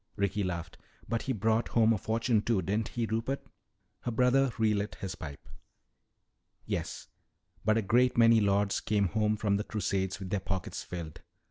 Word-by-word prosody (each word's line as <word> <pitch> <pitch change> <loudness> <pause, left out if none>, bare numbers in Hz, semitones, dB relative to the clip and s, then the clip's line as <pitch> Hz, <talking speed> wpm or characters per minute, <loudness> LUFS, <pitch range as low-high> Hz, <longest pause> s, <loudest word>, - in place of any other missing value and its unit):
Ricky 100 0 0
laughed. 85 -2 -4 0.3
"But 115 - -1
he 135 - -2
brought 110 +1 +1
home 115 -1 +4
a - - 0
fortune, 115 +1 +1
too, 105 -4 +1
didn't 105 +5 0
he, 120 -2 -2
Rupert?" 115 +5 -2 0.5
Her - - -4
brother 125 +3 +3
relit 105 -2 +1
his 95 -1 -5
pipe. 75 -6 -9 1.2
"Yes, - - -4 0.6
but 110 +2 +3
a 115 - +1
great 125 +5 +3
many 115 -1 +7
lords 100 0 +2
came 100 -3 +1
home 105 +1 +1
from 100 -2 +1
the 105 - -2
Crusades 95 -3 -1
with 95 -2 -7
their 100 - +1
pockets 95 -1 -4
filled. 85 -4 -7
105 Hz, 165 wpm, -30 LUFS, 95-115 Hz, 1.2 s, many